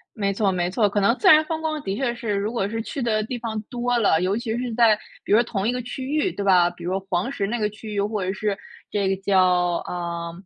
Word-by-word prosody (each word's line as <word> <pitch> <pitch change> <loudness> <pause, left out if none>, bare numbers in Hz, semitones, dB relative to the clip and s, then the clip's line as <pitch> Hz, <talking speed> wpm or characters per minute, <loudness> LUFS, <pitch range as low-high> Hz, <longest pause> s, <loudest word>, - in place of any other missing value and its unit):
没 200 -2 0
错 200 0 +1
没 175 -2 0
错， 210 +2 +2
可 205 +1 0
能 230 +5 +3
自 390 - +4
然 310 -3 +8
风 320 0 -4
光 310 -1 -2
的 195 -4 -3
确 240 -1 -1
是 230 -3 -3
如 200 +2 -1
果 200 -5 -1
是 225 +1 -3
去 280 +5 -5
的 220 -3 +1
地 245 +3 -4
方 225 -2 -4
多 245 0 0
了， 200 -8 +3
尤 190 +3 +1
其 230 -1 -2
是 245 -2 -3
在 225 -2 +5 0.3
比 - - -2
如 220 +3 +6
同 210 -4 -3
一 245 - +2
个 250 - -2
区 245 +2 -6
域， 305 +6 0
对 200 - -4
吧？ 180 -3 +5
比 175 0 -11
如 185 +2 -1
黄 180 +8 0
石 200 -8 -2
那 235 +4 -2
个 210 - +1
区 210 0 -9
域 200 - +1
或 205 -1 -1
者 185 - -1
是 205 0 -2 0.3
这 200 -2 0
个 195 - +1
叫， 195 -1 +3 0.5
啊， 170 -1 -4
215 Hz, 285 characters per minute, -23 LUFS, 195-240 Hz, 0.5 s, 然